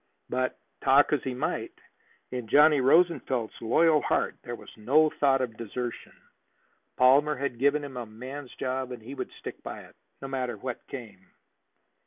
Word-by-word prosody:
But, 130 Hz, 0 st, -1 dB, 0.3 s
talk 140 Hz, +2 st, +5 dB
as 145 Hz, -, +2 dB
he 130 Hz, -1 st, -4 dB
might, 125 Hz, -, -3 dB, 0.6 s
in 125 Hz, -3 st, -4 dB
Johnny 150 Hz, +3 st, +6 dB
Rosenfeld's 135 Hz, -5 st, +2 dB
loyal 155 Hz, +7 st, +4 dB
heart -, -, 0 dB
there 120 Hz, -, -6 dB
was -, -, -14 dB
no 145 Hz, +8 st, +3 dB
thought 135 Hz, -2 st, +2 dB
of 115 Hz, -4 st, -3 dB
desertion. 120 Hz, +2 st, -5 dB, 0.8 s
Palmer 140 Hz, +4 st, +5 dB
had 130 Hz, -3 st, -3 dB
given 140 Hz, +2 st, +3 dB
him 135 Hz, -3 st, -7 dB
a 120 Hz, -2 st, -5 dB
man's 130 Hz, +5 st, -9 dB
job, 130 Hz, 0 st, -3 dB
and 120 Hz, -3 st, -8 dB
he 130 Hz, +5 st, -8 dB
would -, -, -5 dB
stick -, -, -8 dB
by -, -, -7 dB
it, -, -, -17 dB, 0.2 s
no 135 Hz, -, -6 dB
matter 130 Hz, -2 st, -3 dB
what 130 Hz, -2 st, -6 dB
came. 105 Hz, -8 st, -9 dB
130 Hz, 165 wpm, -28 LUFS, 120-140 Hz, 0.8 s, Johnny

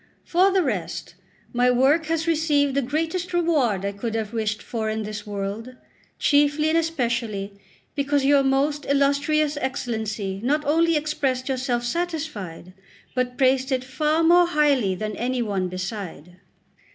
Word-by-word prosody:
For 365 Hz, +3 st, +4 dB
the 380 Hz, -1 st, +2 dB
rest, -, -, -3 dB, 0.4 s
my 245 Hz, +1 st, +3 dB
work 275 Hz, +6 st, +3 dB
has 325 Hz, 0 st, 0 dB
received 300 Hz, -4 st, +2 dB
the 280 Hz, -, +1 dB
greatest 325 Hz, +7 st, -2 dB
reward 275 Hz, -, +1 dB
I 200 Hz, -, -1 dB
could 220 Hz, +3 st, -4 dB
have 220 Hz, -1 st, -3 dB
wished 215 Hz, -2 st, -2 dB
for 220 Hz, -2 st, -3 dB
in 220 Hz, 0 st, -2 dB
this 210 Hz, 0 st, -6 dB
world; 205 Hz, +5 st, -5 dB, 0.4 s
chiefly 290 Hz, +1 st, +3 dB
and 325 Hz, -, +2 dB
especially 235 Hz, -10 st, -2 dB, 0.4 s
because 285 Hz, -1 st, 0 dB
your 280 Hz, 0 st, +5 dB
most 280 Hz, +2 st, 0 dB
illustrious 285 Hz, +2 st, +2 dB
Excellency 220 Hz, -7 st, -3 dB
not 295 Hz, +4 st, +1 dB
only 330 Hz, +3 st, +3 dB
expressed 275 Hz, -4 st, -1 dB
yourself 255 Hz, -2 st, -1 dB
satisfied, 275 Hz, -, -4 dB, 0.4 s
but 250 Hz, -1 st, -2 dB
praised 265 Hz, 0 st, +2 dB
it 255 Hz, -1 st, 0 dB
far 305 Hz, +5 st, 0 dB
more 350 Hz, +1 st, +6 dB
highly 285 Hz, -, +2 dB
than 215 Hz, +2 st, -4 dB
any 250 Hz, 0 st, -1 dB
one 195 Hz, -4 st, -1 dB
beside. 185 Hz, -3 st, -6 dB
265 Hz, 145 wpm, -24 LUFS, 220-300 Hz, 0.4 s, more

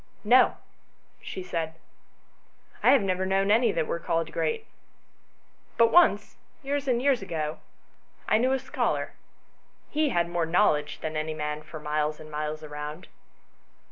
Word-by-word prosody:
"No," 245 Hz, +4 st, +5 dB, 0.6 s
she 185 Hz, -, -6 dB
said, 165 Hz, -3 st, -3 dB, 1.1 s
"I -, -, +5 dB
have 275 Hz, -7 st, +6 dB
never 185 Hz, -1 st, 0 dB
known 195 Hz, +1 st, +1 dB
any 230 Hz, +1 st, +4 dB
that 165 Hz, -4 st, 0 dB
were 170 Hz, -, -3 dB
called 165 Hz, -1 st, -1 dB
great; 455 Hz, -, -1 dB, 1.1 s
but 230 Hz, 0 st, +5 dB
once, 270 Hz, -, +4 dB, 0.3 s
years 280 Hz, 0 st, -2 dB
and 245 Hz, -2 st, +2 dB
years 265 Hz, -2 st, +2 dB
ago, 155 Hz, -5 st, -3 dB, 0.7 s
I 215 Hz, -, +4 dB
knew 255 Hz, +2 st, +2 dB
a -, -, +2 dB
scholar: -, -, -2 dB, 0.8 s
he 305 Hz, 0 st, +1 dB
had 170 Hz, -8 st, +1 dB
more 170 Hz, -1 st, -1 dB
knowledge 160 Hz, -4 st, +2 dB
than 155 Hz, 0 st, -4 dB
any 155 Hz, 0 st, -2 dB
man 150 Hz, 0 st, -3 dB
for 155 Hz, 0 st, -9 dB
miles 150 Hz, 0 st, -1 dB
and 155 Hz, 0 st, -11 dB
miles 150 Hz, +1 st, -4 dB
round." 150 Hz, +2 st, -7 dB
170 Hz, 145 wpm, -27 LUFS, 155-230 Hz, 1.1 s, have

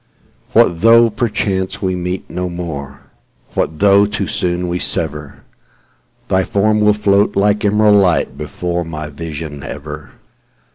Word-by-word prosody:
What 85 Hz, -1 st, +3 dB
though, 115 Hz, +1 st, +6 dB
perchance, 100 Hz, -4 st, -2 dB
we 95 Hz, -2 st, -1 dB, 0.3 s
no 90 Hz, 0 st, -4 dB
more 85 Hz, -6 st, -5 dB, 0.6 s
meet,—What 80 Hz, -, -2 dB
though 100 Hz, +1 st, +5 dB
too 105 Hz, -, -3 dB
soon 90 Hz, 0 st, -2 dB
we 90 Hz, +1 st, -2 dB
sever? 75 Hz, -4 st, -4 dB, 0.8 s
Thy 95 Hz, 0 st, +2 dB
form 105 Hz, +3 st, +1 dB
will 105 Hz, 0 st, +4 dB
float 100 Hz, -1 st, +2 dB
like 105 Hz, +2 st, +2 dB
emerald 105 Hz, 0 st, +4 dB
lightBefore 85 Hz, 0 st, -1 dB
my 75 Hz, -2 st, -6 dB
vision 75 Hz, -1 st, -7 dB
ever. 75 Hz, +2 st, -8 dB
90 Hz, 125 wpm, -16 LUFS, 80-105 Hz, 0.8 s, though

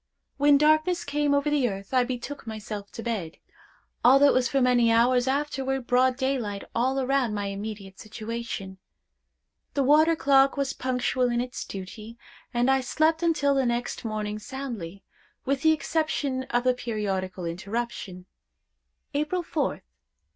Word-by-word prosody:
When 285 Hz, 0 st, +5 dB
darkness 310 Hz, +4 st, +3 dB
came 290 Hz, 0 st, 0 dB
over 285 Hz, +1 st, +1 dB
the 275 Hz, -5 st, +2 dB
earth, 195 Hz, +3 st, -8 dB
I 255 Hz, -1 st, +4 dB
betook 255 Hz, +2 st, -6 dB
myself 215 Hz, -2 st, -6 dB
to 230 Hz, -, -7 dB
bed, 200 Hz, -9 st, -3 dB, 0.7 s
although 270 Hz, +3 st, +7 dB
it -, -, +3 dB
was 255 Hz, -1 st, +2 dB
for 275 Hz, -, +1 dB
many 245 Hz, -2 st, +4 dB
hours 245 Hz, +2 st, +3 dB
afterward 270 Hz, -2 st, -1 dB
broad 250 Hz, +1 st, +3 dB
daylight 255 Hz, -7 st, -2 dB
all 260 Hz, +3 st, +1 dB
around 260 Hz, -4 st, +1 dB
my 205 Hz, -1 st, -2 dB
immediate 200 Hz, -1 st, -7 dB
situation. 215 Hz, -3 st, -6 dB, 1.0 s
The 280 Hz, -, +2 dB
water 310 Hz, +4 st, +5 dB
clock 275 Hz, -2 st, +4 dB
was 275 Hz, -1 st, -1 dB
punctual 255 Hz, 0 st, 0 dB
in 240 Hz, 0 st, 0 dB
its 250 Hz, +1 st, -4 dB
duty, 210 Hz, +4 st, -8 dB, 0.3 s
and 240 Hz, 0 st, +1 dB
I 270 Hz, 0 st, +3 dB
slept 315 Hz, +5 st, +1 dB
until 285 Hz, -5 st, +2 dB
next 240 Hz, 0 st, -2 dB
morning 215 Hz, -1 st, -3 dB
soundly, 225 Hz, -8 st, -7 dB, 0.4 s
with 275 Hz, 0 st, 0 dB
the 315 Hz, -, +5 dB
exception 305 Hz, -4 st, -1 dB
of 245 Hz, 0 st, +1 dB
the 255 Hz, 0 st, +3 dB
periodical 195 Hz, -6 st, -3 dB
interruption. 190 Hz, +1 st, -5 dB, 0.9 s
"April 305 Hz, +5 st, -1 dB
4th. 305 Hz, -4 st, -2 dB
250 Hz, 145 wpm, -26 LUFS, 215-275 Hz, 1.0 s, although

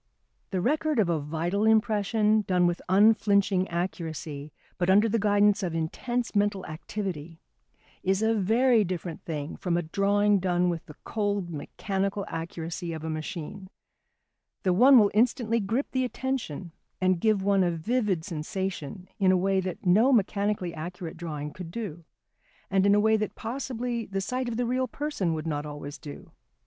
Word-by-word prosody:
The 185 Hz, -2 st, -1 dB
record 305 Hz, -, +1 dB
of 205 Hz, -6 st, +3 dB
a 165 Hz, -2 st, +1 dB
vital 165 Hz, +7 st, -1 dB
impression 215 Hz, 0 st, +3 dB
done 180 Hz, -1 st, +3 dB
with 175 Hz, 0 st, 0 dB
unflinching 200 Hz, -1 st, +4 dB
accuracy, 160 Hz, -4 st, -4 dB, 0.3 s
but 175 Hz, 0 st, +1 dB
under 205 Hz, +4 st, +5 dB
the 225 Hz, +1 st, +1 dB
guidance 205 Hz, 0 st, +3 dB
of 175 Hz, -4 st, -2 dB
intense 235 Hz, +10 st, -2 dB
mental 205 Hz, -2 st, +1 dB
activity, 165 Hz, -1 st, -5 dB, 0.6 s
is 190 Hz, +3 st, +1 dB
a 225 Hz, +1 st, +3 dB
very 225 Hz, +3 st, +3 dB
different 175 Hz, -3 st, -4 dB
thing 150 Hz, -2 st, -5 dB
from 175 Hz, -2 st, -1 dB
a 175 Hz, -, 0 dB
drawing 200 Hz, +4 st, +2 dB
done 180 Hz, -1 st, +1 dB
with 170 Hz, -2 st, -3 dB
the 150 Hz, -, -11 dB
cold, 205 Hz, -4 st, -2 dB
mechanical 195 Hz, +5 st, -3 dB
accuracy 165 Hz, +1 st, -5 dB
of 160 Hz, -1 st, -6 dB
a 160 Hz, -, -3 dB
machine. 160 Hz, +4 st, -6 dB, 0.9 s
The 185 Hz, -, +3 dB
one 255 Hz, +8 st, +7 dB
will 205 Hz, -3 st, +5 dB
instantly 230 Hz, +1 st, +2 dB
grip 225 Hz, +7 st, -1 dB
the 260 Hz, -1 st, +1 dB
attention 250 Hz, -, -3 dB, 0.3 s
and 185 Hz, -2 st, +2 dB
give 215 Hz, -3 st, +2 dB
one 195 Hz, -1 st, +3 dB
a 175 Hz, -, +2 dB
vivid 185 Hz, 0 st, -1 dB
sensation 180 Hz, 0 st, -4 dB
in 190 Hz, -2 st, +4 dB
a 185 Hz, -, +4 dB
way 190 Hz, +1 st, +2 dB
that 185 Hz, -1 st, -5 dB
no 215 Hz, +9 st, +5 dB
mechanically 200 Hz, -5 st, +1 dB
accurate 170 Hz, +1 st, -6 dB
drawing 150 Hz, -3 st, -5 dB
could 180 Hz, -3 st, -8 dB
do, 170 Hz, -5 st, -6 dB, 0.7 s
and 195 Hz, 0 st, +3 dB
in 200 Hz, -, +5 dB
a -, -, +4 dB
way 220 Hz, +1 st, +4 dB
that 215 Hz, 0 st, -3 dB
possibly 240 Hz, -1 st, -3 dB
the 195 Hz, 0 st, -2 dB
sight 250 Hz, +5 st, -2 dB
of 225 Hz, -, -3 dB
the 245 Hz, -, 0 dB
real 255 Hz, +2 st, 0 dB
person 225 Hz, -, -2 dB
would 155 Hz, 0 st, -5 dB
not 150 Hz, -2 st, -2 dB
always 145 Hz, -1 st, -7 dB
do. 145 Hz, -2 st, -10 dB
195 Hz, 165 wpm, -27 LUFS, 170-215 Hz, 0.9 s, one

